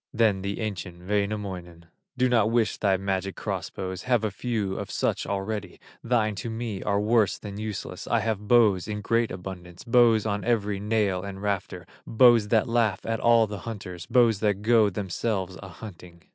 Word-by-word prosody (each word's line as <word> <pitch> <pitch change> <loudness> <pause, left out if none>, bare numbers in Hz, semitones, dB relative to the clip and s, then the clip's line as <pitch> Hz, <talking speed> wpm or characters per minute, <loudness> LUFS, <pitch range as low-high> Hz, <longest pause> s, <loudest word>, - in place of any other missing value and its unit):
Then 110 -4 +2
the 100 +3 -4
ancient 90 -4 -5
Wainamoinen: 100 -5 -3 0.3
"Do 125 0 +3
not 115 -4 +3
wish 115 -2 +1
thy 95 -2 +2
magic 95 0 -2
cross - - -4
bows, 95 -1 -5
Have 120 -3 +1
a 110 - 0
few 105 -2 -2
of - - -5
such - - -1
already, 100 +1 -4 0.2
Thine 115 -3 +1
to 115 - -4
me 115 -3 -4
are 100 -1 0
worse 105 -2 +2
than 100 -1 -8
useless; 105 -4 -5
I 120 - +2
have 105 -2 -2
bows 110 -6 +4
in 105 -1 -4
great 115 +2 +1
abundance, 90 -1 -8
Bows 115 -2 +4
on 105 -2 -1
every 105 -4 0
nail 105 -3 0
and 95 0 -7
rafter, 100 -3 -3 0.2
Bows 115 -2 +5
that 110 0 +2
laugh 115 -4 +1
at 115 0 -1
all 115 -1 +5
the 105 -2 -6
hunters, 90 -6 -7
Bows 115 -5 +4
that 105 -2 0
go 110 -2 +4
themselves 95 0 -3
a 95 - -8
hunting." 85 -3 -12
105 Hz, 180 wpm, -26 LUFS, 95-115 Hz, 0.3 s, Bows